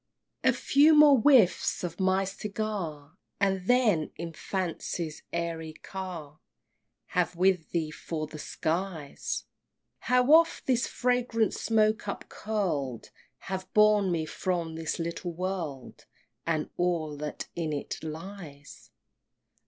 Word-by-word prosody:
II. -, -, +5 dB
A -, -, +4 dB
few 300 Hz, +3 st, +5 dB
more 295 Hz, -3 st, +8 dB
whiffs 250 Hz, -13 st, +4 dB
of 175 Hz, -1 st, -4 dB
my 190 Hz, 0 st, +3 dB
segar 190 Hz, -6 st, -4 dB, 0.2 s
And 190 Hz, -2 st, +1 dB
then, 225 Hz, -11 st, +3 dB
in 165 Hz, 0 st, -6 dB
Fancy's 170 Hz, -2 st, -3 dB
airy 165 Hz, -2 st, -3 dB
car, 170 Hz, -5 st, -7 dB, 0.7 s
Have 180 Hz, -1 st, 0 dB
with 180 Hz, -2 st, +2 dB
thee 160 Hz, -3 st, -1 dB
for 155 Hz, 0 st, -4 dB
the 155 Hz, 0 st, -10 dB
skies: 165 Hz, -2 st, -3 dB, 0.6 s
How 250 Hz, 0 st, +3 dB
oft 330 Hz, +1 st, +5 dB
this 250 Hz, -2 st, +2 dB
fragrant 245 Hz, -3 st, +1 dB
smoke 215 Hz, -1 st, +1 dB
upcurl'd 175 Hz, -, -3 dB, 0.3 s
Hath 190 Hz, -1 st, -5 dB
borne 210 Hz, -2 st, +5 dB
me 160 Hz, -2 st, 0 dB
from 170 Hz, -1 st, -2 dB
this 160 Hz, -1 st, -3 dB
little 170 Hz, +1 st, -4 dB
world, 165 Hz, -7 st, -5 dB, 0.4 s
And 155 Hz, -2 st, -1 dB
all 170 Hz, -4 st, 0 dB
that 150 Hz, 0 st, -5 dB
in 165 Hz, -2 st, -2 dB
it 145 Hz, -1 st, -4 dB
lies! 160 Hz, -3 st, -9 dB
180 Hz, 120 wpm, -28 LUFS, 160-210 Hz, 0.7 s, more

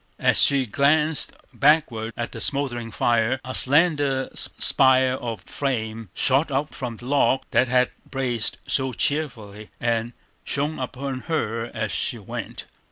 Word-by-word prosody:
As -, -, +3 dB
she 140 Hz, -2 st, +4 dB
glanced 150 Hz, +6 st, +2 dB, 0.2 s
backward 135 Hz, -7 st, +2 dB
at 120 Hz, -, -3 dB
the -, -, -7 dB
smouldering 125 Hz, -5 st, -1 dB
fire, 120 Hz, +3 st, +1 dB
a 130 Hz, -, -5 dB
slender 145 Hz, -2 st, +2 dB
spire 130 Hz, 0 st, +3 dB
of 115 Hz, -6 st, -5 dB
flame 115 Hz, -6 st, -3 dB
shot 135 Hz, +5 st, +3 dB
up 140 Hz, +2 st, -2 dB
from 120 Hz, -3 st, -5 dB
the 120 Hz, -, -11 dB
log 135 Hz, 0 st, +2 dB
that 125 Hz, -, +3 dB
had 125 Hz, 0 st, +2 dB, 0.2 s
blazed 125 Hz, -4 st, -1 dB
so 130 Hz, -1 st, 0 dB
cheerily, 110 Hz, -9 st, -2 dB
and 115 Hz, 0 st, -1 dB, 0.3 s
shone 145 Hz, +2 st, -1 dB
upon 130 Hz, +1 st, -4 dB
her 115 Hz, -7 st, -1 dB
as 110 Hz, -2 st, -2 dB
she 120 Hz, -, -1 dB
went. 105 Hz, -, -7 dB
130 Hz, 140 wpm, -23 LUFS, 115-140 Hz, 0.3 s, she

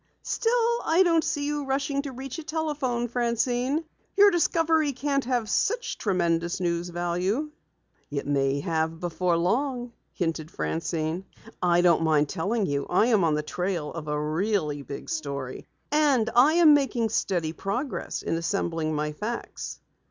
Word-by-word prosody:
"Still, 470 Hz, 0 st, +1 dB
I 335 Hz, +4 st, +4 dB
don't 330 Hz, -2 st, +3 dB
see 290 Hz, -4 st, -1 dB
you 295 Hz, 0 st, -1 dB
rushing 275 Hz, +1 st, -1 dB
to 280 Hz, -1 st, -6 dB
reach 265 Hz, +4 st, -6 dB
a -, -, -7 dB
telephone, 295 Hz, -7 st, -1 dB
Francine. 245 Hz, +5 st, 0 dB, 0.3 s
Your 405 Hz, 0 st, +8 dB
discovery 325 Hz, -3 st, +2 dB
can't 275 Hz, +1 st, -1 dB
have 245 Hz, -3 st, 0 dB
such 470 Hz, -, 0 dB
tremendous 170 Hz, -3 st, 0 dB
news 175 Hz, -1 st, -1 dB
value." 180 Hz, -, -1 dB, 0.6 s
"It 145 Hz, -1 st, -3 dB
may 140 Hz, 0 st, +1 dB
have 160 Hz, +1 st, -1 dB
before 175 Hz, 0 st, 0 dB
long," 245 Hz, +7 st, 0 dB, 0.2 s
hinted 165 Hz, -3 st, -2 dB
Francine. 165 Hz, +1 st, -2 dB, 0.4 s
"I 175 Hz, -1 st, +4 dB
don't 175 Hz, -2 st, +4 dB
mind 155 Hz, -2 st, +2 dB
telling 205 Hz, +5 st, 0 dB
you 140 Hz, -3 st, -2 dB
I 185 Hz, +5 st, +4 dB
am 200 Hz, -4 st, +4 dB
on 160 Hz, -2 st, +3 dB
the 150 Hz, -, -1 dB
trail 175 Hz, -1 st, -3 dB
of 165 Hz, -2 st, -6 dB
a 150 Hz, 0 st, -1 dB
really 155 Hz, -1 st, -1 dB
big 140 Hz, 0 st, -8 dB
story. 140 Hz, -4 st, -4 dB, 0.2 s
And 280 Hz, -7 st, +3 dB
I 265 Hz, +6 st, +6 dB
am 330 Hz, -3 st, +7 dB
making 260 Hz, -6 st, +2 dB
steady 175 Hz, -7 st, -1 dB
progress 245 Hz, -, -3 dB
in -, -, -1 dB
assembling 165 Hz, -3 st, -1 dB
my 150 Hz, 0 st, -1 dB
facts." 215 Hz, +10 st, -5 dB
200 Hz, 150 wpm, -26 LUFS, -, 0.6 s, Your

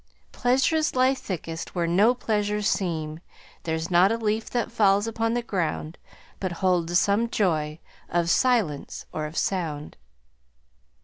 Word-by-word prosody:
"'Pleasures 265 Hz, +6 st, +1 dB
lie 255 Hz, +1 st, +4 dB
thickest 170 Hz, -9 st, -6 dB
where 175 Hz, -1 st, +1 dB
no 200 Hz, +9 st, +4 dB
pleasures 210 Hz, -3 st, -1 dB
seem; 160 Hz, -6 st, -1 dB, 0.5 s
There's 160 Hz, +1 st, -2 dB
not 180 Hz, +3 st, +5 dB
a 230 Hz, -, +1 dB
leaf 220 Hz, 0 st, -1 dB
that 240 Hz, -2 st, -2 dB
falls 205 Hz, -3 st, +3 dB
upon 225 Hz, 0 st, -1 dB
the 240 Hz, -, -1 dB
ground 170 Hz, -6 st, -3 dB, 0.4 s
But 185 Hz, -3 st, -2 dB
holds 175 Hz, -1 st, +1 dB
some 210 Hz, +4 st, +1 dB
joy, 155 Hz, -8 st, 0 dB, 0.3 s
of 170 Hz, -1 st, +1 dB
silence 210 Hz, -, +1 dB
or 155 Hz, -1 st, -2 dB
of 155 Hz, -, -9 dB
sound.' 160 Hz, -6 st, -2 dB
195 Hz, 135 wpm, -25 LUFS, 165-225 Hz, 0.5 s, not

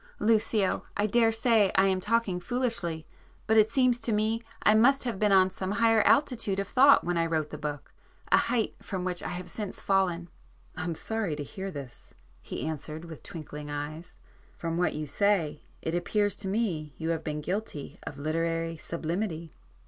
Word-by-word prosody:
Lucio, 215 Hz, -2 st, +2 dB, 0.2 s
I 205 Hz, -, +2 dB
daresay 225 Hz, -1 st, +4 dB
I 190 Hz, -, +5 dB
am 190 Hz, -1 st, +2 dB
talking 210 Hz, -2 st, +1 dB
foolishly,—but 220 Hz, -3 st, -3 dB
it 215 Hz, 0 st, +6 dB
seems 255 Hz, -3 st, +3 dB
to 230 Hz, 0 st, -2 dB
me 220 Hz, +2 st, +1 dB, 0.2 s
I 210 Hz, -, +6 dB
must 260 Hz, +6 st, +5 dB
have 235 Hz, -6 st, -3 dB
been 210 Hz, -1 st, +3 dB
on 190 Hz, -1 st, +5 dB
some 190 Hz, +1 st, -3 dB
higher 225 Hz, 0 st, +4 dB
altitude 235 Hz, -7 st, +2 dB
of 195 Hz, -, -2 dB
thought 275 Hz, +2 st, +6 dB
when 175 Hz, -1 st, 0 dB
I 165 Hz, -, +2 dB
wrote 160 Hz, -2 st, -1 dB
the 150 Hz, -, -6 dB
book,—a 145 Hz, -1 st, -3 dB
height 230 Hz, -3 st, +1 dB
from 190 Hz, -4 st, -4 dB
which 180 Hz, -1 st, -2 dB
I -, -, -4 dB
have 180 Hz, 0 st, -5 dB
since 210 Hz, -3 st, -6 dB
fallen." 180 Hz, -3 st, +1 dB, 0.5 s
"I'm 180 Hz, -1 st, -3 dB
sorry 220 Hz, -4 st, -2 dB
to 145 Hz, -, -4 dB
hear 190 Hz, +7 st, -6 dB
this," 140 Hz, -8 st, -10 dB, 0.3 s
he -, -, -5 dB
answered, 155 Hz, +1 st, -5 dB
with 160 Hz, -3 st, -10 dB
twinkling 150 Hz, -2 st, -8 dB
eyes—"From 155 Hz, +2 st, -7 dB
what 175 Hz, +1 st, +1 dB
you 155 Hz, 0 st, -3 dB
say 160 Hz, -2 st, +1 dB, 0.2 s
it 160 Hz, -, -2 dB
appears 205 Hz, +4 st, +1 dB
to 195 Hz, -, -5 dB
me 180 Hz, -, -1 dB
you 160 Hz, -, -3 dB
have 165 Hz, -1 st, -1 dB
been 150 Hz, -1 st, -3 dB
guilty 180 Hz, -3 st, -4 dB
of 145 Hz, -, -7 dB
literary 165 Hz, +2 st, -1 dB
sublimity. 165 Hz, 0 st, -3 dB
185 Hz, 170 wpm, -28 LUFS, 160-220 Hz, 0.5 s, it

